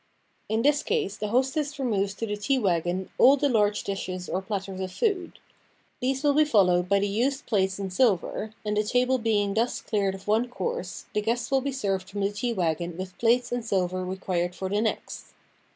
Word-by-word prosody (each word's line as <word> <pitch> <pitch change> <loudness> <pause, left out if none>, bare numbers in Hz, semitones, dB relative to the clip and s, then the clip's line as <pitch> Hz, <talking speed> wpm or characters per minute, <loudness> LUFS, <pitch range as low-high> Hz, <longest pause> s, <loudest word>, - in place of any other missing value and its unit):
In 220 +1 +1
this 290 +1 +4
case 200 - -1
the 210 - -3
hostess 265 +5 0
removes 200 -7 0
to 225 - -3
the 210 -1 -2
tea 210 +7 0
wagon 180 -3 0
all 275 +3 +7
the 285 - +2
large 210 -5 +2
dishes 185 -2 -4
or 185 - -2
platters 195 -1 -4
of 185 -1 -3
food. 385 - -1 0.6
These 265 +2 -1
will 290 -1 +4
be 305 +2 +5
fol 225 -10 +4
lowed 180 0 +1
by 200 - +4
the 200 +1 +1
used 260 +8 0
plates 190 -4 +1
and 195 -2 -4
silver, 215 -1 +1
and 210 0 0
the 210 - +2
table 250 +3 +2
being 210 -3 +1
thus 230 +4 0
cleared 200 -3 -1
of 195 +1 -13
one 220 +4 +2
course, 475 - -4
the 210 - +1
guests 235 +3 -1
will 270 -1 +3
be 280 +1 -2
served 195 -7 -2
from 200 0 -4
the 200 +1 +1
tea 220 +4 -2
wagon 170 -4 -1
with 185 0 -6
plates 240 +2 +2
and 245 -1 -1
silver 185 -4 0
required 180 -1 -2
for 190 0 -4
the 205 +2 +1
next. 220 - -4
210 Hz, 210 wpm, -26 LUFS, 190-250 Hz, 0.6 s, all